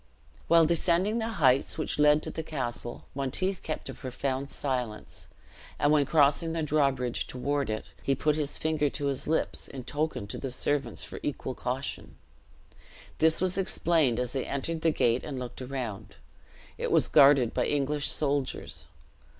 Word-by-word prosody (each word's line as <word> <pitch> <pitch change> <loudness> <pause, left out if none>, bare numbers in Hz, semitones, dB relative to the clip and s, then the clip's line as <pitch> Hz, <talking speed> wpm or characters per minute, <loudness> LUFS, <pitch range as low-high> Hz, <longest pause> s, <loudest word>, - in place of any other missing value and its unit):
While 165 -1 +6
descending 175 +6 +2
the 225 - -1
heights 135 0 +3
which 155 -1 -3
led 150 +1 +5
to - - -4
the - - -4
castle, 120 -6 -4
Monteith 155 +8 -1
kept 155 - -5
a - - -5
profound 135 +1 -3
silence; 125 -6 -4 0.5
and 145 - +2
when 145 -3 +3
crossing 150 +2 +3
the 165 -1 -1
drawbridge 135 -5 0
toward 140 +1 -2
it, 110 0 -3 0.2
he 135 - +1
put 150 +2 +1
his 150 -2 -1
finger 155 -2 0
to 145 +1 -4
his 140 -2 -2
lips, 160 +1 0
in 130 -2 -8
token 145 -4 -2
to 100 - -6
the 135 - -4
servants 135 -1 -1
for - - -8
equal 135 -2 -3
caution. 130 +2 -4 1.0
This 160 0 +4
was 185 +1 0
explained 165 -9 +2
as 125 0 -2
they 135 -2 -2
entered 160 +4 -3
the 165 - +3
gate 120 -5 +1
and 145 -3 -5
looked 125 0 -6
around. 125 -6 -5 0.6
It - - -1
was - - +4
guarded 140 -5 +6
by - - 0
English 145 0 0
soldiers. 140 -3 -2
140 Hz, 165 wpm, -28 LUFS, 130-155 Hz, 1.0 s, While